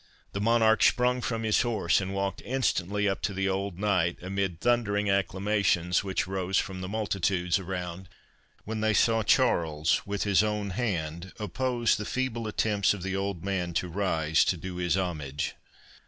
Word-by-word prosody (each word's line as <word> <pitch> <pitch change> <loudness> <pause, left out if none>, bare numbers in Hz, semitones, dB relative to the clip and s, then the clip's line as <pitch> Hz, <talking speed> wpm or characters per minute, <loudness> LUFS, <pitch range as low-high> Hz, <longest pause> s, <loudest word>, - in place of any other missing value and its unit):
The 100 - -4
Monarch 110 0 +4
sprung 125 0 +3
from 115 -2 -2
his 110 -1 +3
horse, 105 -7 +1
and 95 0 -4
walked 100 0 -2
instantly 105 -6 0
up 95 - -1
to 100 - -2
the 95 0 0
old 95 -1 -2
knight, 90 -4 +1
amid 95 -2 -2
thundering 105 -4 +1
acclamations 100 -2 +1
which 95 -2 -1
rose 95 0 -1
from 95 -1 -2
the 95 - -4
multitudes 95 -4 0
around, 90 -1 -5 0.6
when 110 0 -3
they 110 -1 +2
saw 115 +1 +3
Charles 80 -5 +2
with 100 0 -2
his 100 -2 +4
own 105 -2 -1
hand 90 -5 -3
oppose 120 +3 0
the 105 - -4
feeble 120 -3 -2
attempts 105 -2 +1
of 95 - -8
the 95 0 -2
old 95 -3 -3
man 90 -3 -2
to 90 - -1
rise 80 -4 +1
to 90 - +1
do 90 +1 -6
his 90 0 +1
homage. 75 -7 -3
100 Hz, 170 wpm, -28 LUFS, 90-105 Hz, 0.6 s, Monarch